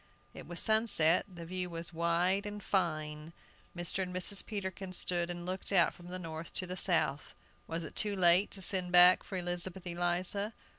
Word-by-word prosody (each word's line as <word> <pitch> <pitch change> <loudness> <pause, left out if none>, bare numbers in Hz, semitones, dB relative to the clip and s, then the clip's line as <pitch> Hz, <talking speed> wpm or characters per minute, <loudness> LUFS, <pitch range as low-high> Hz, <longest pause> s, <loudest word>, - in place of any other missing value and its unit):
It - - -11
was 175 0 -5
sunset; 210 -7 +4
the 170 -2 -9
view 180 +1 -4
was 170 0 -5
wide 175 +4 +1
and 205 0 -7
fine. 155 -4 -2 0.4
Mr. 175 +2 -2
and 185 -1 -4
Mrs. 190 +2 +2
Peterkin 190 -3 -6
stood 175 -1 -1
and 175 0 -5
looked 185 +2 -1
out 180 -4 +4
from 175 - -14
the 180 +1 -5
north 165 -2 -8
to 185 - -2
the 180 0 -6
south. 160 -6 0 0.3
Was 165 +1 -4
it 155 - -9
too 210 -2 -1
late 180 +1 +4
to 195 - -3
send 180 -1 -1
back 180 +1 +7
for 190 - -7
Elizabeth 175 +1 -1
Eliza? 175 +4 -1
180 Hz, 185 wpm, -32 LUFS, 170-190 Hz, 0.4 s, back